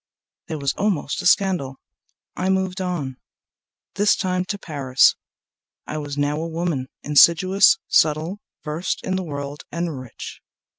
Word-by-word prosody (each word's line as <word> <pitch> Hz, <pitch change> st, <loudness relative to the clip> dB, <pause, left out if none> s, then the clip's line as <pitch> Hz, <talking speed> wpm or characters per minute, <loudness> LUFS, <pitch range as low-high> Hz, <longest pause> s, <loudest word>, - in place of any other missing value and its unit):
) -, -, -69 dB
There 160 Hz, -, -4 dB
was 140 Hz, -1 st, -1 dB
almost 190 Hz, -6 st, 0 dB
a 180 Hz, -, +1 dB
scandal. 180 Hz, -10 st, +2 dB, 0.6 s
I 185 Hz, -, -1 dB
moved 190 Hz, 0 st, 0 dB
on, 155 Hz, -8 st, -3 dB, 0.8 s
This 205 Hz, +1 st, +3 dB
time 185 Hz, -2 st, -1 dB
to 200 Hz, +2 st, -3 dB
Paris. 140 Hz, -8 st, +3 dB, 0.7 s
I 155 Hz, -, -4 dB
was 145 Hz, -1 st, -6 dB
now 145 Hz, +2 st, 0 dB
a 165 Hz, -, -3 dB
woman, 165 Hz, -5 st, -2 dB, 0.2 s
Insidious, 185 Hz, +6 st, +5 dB
subtle, 160 Hz, +6 st, +2 dB, 0.2 s
versed 155 Hz, +4 st, -3 dB
in 185 Hz, -, -1 dB
the 190 Hz, -, -1 dB
world 145 Hz, -3 st, -6 dB
and 170 Hz, -5 st, -3 dB
rich. 130 Hz, -3 st, -9 dB
165 Hz, 145 wpm, -22 LUFS, 145-185 Hz, 0.8 s, Insidious